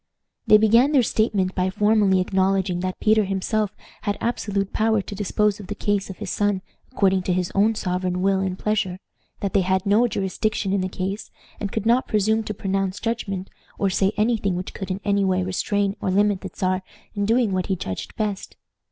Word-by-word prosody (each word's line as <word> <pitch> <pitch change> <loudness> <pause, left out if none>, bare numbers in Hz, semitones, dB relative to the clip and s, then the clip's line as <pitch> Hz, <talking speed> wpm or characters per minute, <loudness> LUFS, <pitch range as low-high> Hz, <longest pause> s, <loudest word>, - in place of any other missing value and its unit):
They 215 - +8
began 230 +7 +4
their 265 -4 +5
statement 205 -4 +1
by 185 0 0
formally 205 -1 +3
acknowledging 190 -1 +1
that 185 +1 -3
Peter 215 0 +4
himself 200 +2 -1 0.3
had 205 0 -1
absolute 200 -4 -2
power 220 0 +2
to 200 - -6
dispose 205 +1 0
of 200 - -9
the 205 - -4
case 205 -1 -1
of 190 - -7
his 210 -3 -5
son 205 -2 0 0.3
according 195 -6 +2
to 180 0 -1
his 180 -1 -1
own 215 +3 +3
sovereign 180 -1 -1
will 195 0 +3
and 190 -1 -2
pleasure; 205 -4 -1 0.4
that 200 -2 -2
they 195 - +4
had 190 +1 0
no 210 +5 +4
jurisdiction 195 0 -1
in 200 - +1
the 185 - -2
case, 195 +2 -4 0.3
and 200 -2 -3
could 220 -1 -3
not 240 +3 +3
presume 215 +1 +2
to 210 - -3
pronounce 195 0 -1
judgment, 200 -5 -3 0.3
or 195 -1 +1
say 195 +1 +2
any 225 +2 +2
thing 195 -4 -1
which 180 +1 -5
could 195 -2 -6
in 190 +1 -3
any 200 -1 +2
way 185 -1 +1
restrain 200 +2 0
or - - -1
limit 200 0 +2
the - - -6
Czar 185 -1 -1 0.3
in 205 -2 -1
doing 230 -1 +3
what 185 -1 -1
he 190 - +1
judged 95 - -6
best. 210 -3 -3
200 Hz, 205 wpm, -23 LUFS, 190-215 Hz, 0.4 s, They